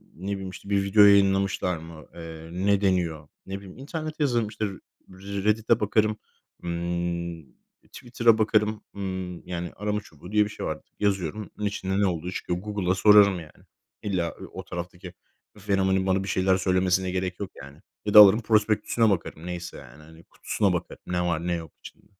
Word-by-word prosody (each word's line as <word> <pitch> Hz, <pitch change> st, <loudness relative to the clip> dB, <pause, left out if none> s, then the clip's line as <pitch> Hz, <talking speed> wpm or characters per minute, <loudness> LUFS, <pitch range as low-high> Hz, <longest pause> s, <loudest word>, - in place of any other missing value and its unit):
ne 95 Hz, +4 st, -5 dB
bileyim, 95 Hz, -1 st, -4 dB
işte, 100 Hz, +2 st, -11 dB
bir 100 Hz, -1 st, +2 dB
video 105 Hz, +2 st, +5 dB
yayınlamışlar 100 Hz, -2 st, +4 dB
mı? 80 Hz, -1 st, -11 dB
Eee, 80 Hz, -1 st, -9 dB
ne 100 Hz, +3 st, +1 dB
deniyor? 85 Hz, -6 st, 0 dB, 0.2 s
Ne 95 Hz, +1 st, -5 dB
bileyim 95 Hz, -2 st, -13 dB
internete 155 Hz, +3 st, -5 dB
yazarım, 120 Hz, -5 st, +1 dB
işte, 105 Hz, 0 st, -3 dB, 0.4 s
R 100 Hz, +1 st, -6 dB
Reddit’e 110 Hz, +2 st, +2 dB
bakarım, 110 Hz, 0 st, +1 dB, 0.5 s
ımm, 85 Hz, -1 st, -3 dB, 0.5 s
Twitter'a 115 Hz, -2 st, +2 dB
bakarım. 110 Hz, -1 st, +1 dB
Imm 95 Hz, -3 st, -5 dB
yani 85 Hz, -1 st, -4 dB
arama 105 Hz, +1 st, -2 dB
çubuğu 90 Hz, +1 st, -14 dB
diye 105 Hz, 0 st, +4 dB
bir -, -, -6 dB
şey 105 Hz, -, -6 dB
var. -, -, -3 dB, 0.2 s
Yazıyorum 100 Hz, 0 st, -1 dB
bunun 105 Hz, -, -3 dB
içinde 95 Hz, -1 st, -2 dB
ne 100 Hz, -, +3 dB
olduğu 90 Hz, 0 st, -3 dB
çıkıyor. 90 Hz, -1 st, -3 dB
Google'a 100 Hz, -2 st, -1 dB
sorarım, 100 Hz, -1 st, +6 dB
yani. 80 Hz, -2 st, -14 dB, 0.4 s
İlla, 90 Hz, -5 st, -1 dB
eee, -, -, -8 dB
o -, -, -6 dB
taraftaki 90 Hz, +1 st, -7 dB, 0.4 s
fenomenin 95 Hz, -1 st, +1 dB
bana 95 Hz, +1 st, +2 dB
bir -, -, -6 dB
şeyler 95 Hz, 0 st, +2 dB
söylemesine 95 Hz, -1 st, +1 dB
gerek 90 Hz, -1 st, -3 dB
yok, 100 Hz, -3 st, -5 dB
yani. 70 Hz, +1 st, -13 dB, 0.3 s
Ya 105 Hz, -, -1 dB
da 105 Hz, -, +11 dB
alırım 105 Hz, +2 st, +9 dB
prospektüsüne 110 Hz, +1 st, +2 dB
bakarım 85 Hz, -3 st, -2 dB
neyse, 90 Hz, -1 st, -6 dB
yani, 70 Hz, +4 st, -14 dB
hani, 80 Hz, +1 st, -16 dB
kutusuna 100 Hz, -4 st, -1 dB
bakarım 90 Hz, -, -4 dB
ne 90 Hz, -1 st, -1 dB
var 85 Hz, -1 st, -1 dB
ne 90 Hz, -, +1 dB
yok 80 Hz, -3 st, -5 dB
içinde. -, -, -14 dB
95 Hz, 175 wpm, -26 LUFS, 85-105 Hz, 0.5 s, da